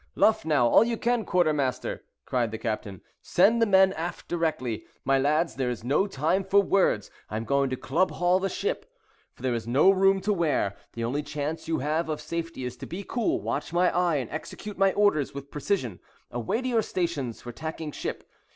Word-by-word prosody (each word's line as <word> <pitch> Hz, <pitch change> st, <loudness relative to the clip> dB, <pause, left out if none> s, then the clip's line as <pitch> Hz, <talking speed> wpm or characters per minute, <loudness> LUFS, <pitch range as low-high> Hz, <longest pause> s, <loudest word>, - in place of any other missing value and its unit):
"Luff 220 Hz, 0 st, +3 dB
now, 145 Hz, -6 st, +3 dB
all 120 Hz, -, +6 dB
you 230 Hz, 0 st, -1 dB
can, 240 Hz, 0 st, +1 dB
quartermaster," 150 Hz, -9 st, 0 dB, 0.2 s
cried 120 Hz, -3 st, 0 dB
the 110 Hz, -, -5 dB
captain. 110 Hz, -4 st, -4 dB, 0.2 s
"Send 225 Hz, +6 st, +3 dB
the 230 Hz, -, +4 dB
men 190 Hz, -1 st, +5 dB
aft 170 Hz, +1 st, -5 dB
directly. 130 Hz, -10 st, -2 dB, 0.2 s
My 135 Hz, 0 st, +3 dB
lads, 155 Hz, +5 st, +2 dB
there 130 Hz, -2 st, 0 dB
is 120 Hz, -2 st, -4 dB
no 145 Hz, +11 st, +2 dB
time 180 Hz, +3 st, 0 dB
for 195 Hz, +1 st, +4 dB
words—I 180 Hz, -, 0 dB
am 110 Hz, -, -4 dB
going 140 Hz, 0 st, +2 dB
to 130 Hz, -, -1 dB
club 165 Hz, +9 st, +1 dB
haul 180 Hz, +1 st, +2 dB
the 195 Hz, +1 st, -1 dB
ship, 475 Hz, -, -3 dB, 0.4 s
for -, -, -17 dB
there 130 Hz, -2 st, +1 dB
is 115 Hz, -1 st, -3 dB
no 140 Hz, +10 st, +5 dB
room 195 Hz, 0 st, +4 dB
to 210 Hz, +2 st, +1 dB
wear. 155 Hz, -, 0 dB, 0.2 s
The 115 Hz, -, -4 dB
only 130 Hz, +6 st, -1 dB
chance 150 Hz, +2 st, -4 dB
you 160 Hz, -1 st, 0 dB
have 155 Hz, +4 st, -1 dB
of 155 Hz, -, -2 dB
safety 165 Hz, -5 st, -4 dB
is 125 Hz, 0 st, -5 dB
to -, -, -8 dB
be 190 Hz, +4 st, -6 dB
cool, 295 Hz, -, -1 dB
watch -, -, -3 dB
my 180 Hz, +1 st, +2 dB
eye, 175 Hz, -2 st, +2 dB
and 130 Hz, -6 st, -2 dB
execute 200 Hz, +6 st, -6 dB
my 195 Hz, 0 st, +5 dB
orders 200 Hz, -10 st, +2 dB
with 140 Hz, 0 st, -8 dB
precision. 145 Hz, -, -2 dB, 0.3 s
Away 120 Hz, -, -2 dB
to -, -, -2 dB
your 235 Hz, -3 st, +2 dB
stations 165 Hz, -, -2 dB
for 120 Hz, -, -8 dB
tacking 160 Hz, +3 st, -5 dB
ship. -, -, -5 dB
160 Hz, 205 wpm, -27 LUFS, 130-190 Hz, 0.4 s, all